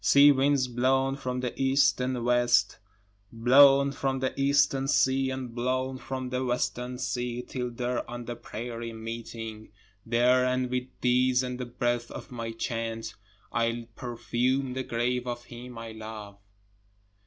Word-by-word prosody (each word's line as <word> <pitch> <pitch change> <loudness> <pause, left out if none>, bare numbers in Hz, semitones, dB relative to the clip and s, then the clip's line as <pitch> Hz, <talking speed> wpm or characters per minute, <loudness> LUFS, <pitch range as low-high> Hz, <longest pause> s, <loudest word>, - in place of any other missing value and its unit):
Sea 145 +1 +7
winds 135 -1 +2
blown 130 +2 +1
from 125 -2 -3
the 125 - -2
east 135 0 +3
and 125 -2 -1
west, 120 -4 +3 0.5
Blown 135 +4 +6
from 135 -1 -1
the 130 0 -1
Eastern 140 -1 +2
sea 135 -1 +3
and 130 -2 -5
blown 130 +2 -1
from 130 -1 -5
the 130 0 -1
Western 125 0 -2
sea, 125 -1 -3
till 125 -1 -4
there 120 0 -3
on 120 0 -6
the 120 - -5
prairies 115 0 -6
meeting, 115 -1 -7 0.3
These 115 +1 0
and 125 0 +3
with 125 0 -1
these 125 +1 +3
and 125 0 -4
the 125 - -4
breath 120 0 -1
of - - -9
my 115 -2 -4
chant, 115 0 -4 0.4
I'll 115 0 0
perfume 125 +2 -1
the 130 - -2
grave 125 0 -1
of 120 0 -4
him 120 0 -10
I 115 0 -7
love. 110 -2 -9
125 Hz, 150 wpm, -28 LUFS, 120-130 Hz, 0.5 s, Sea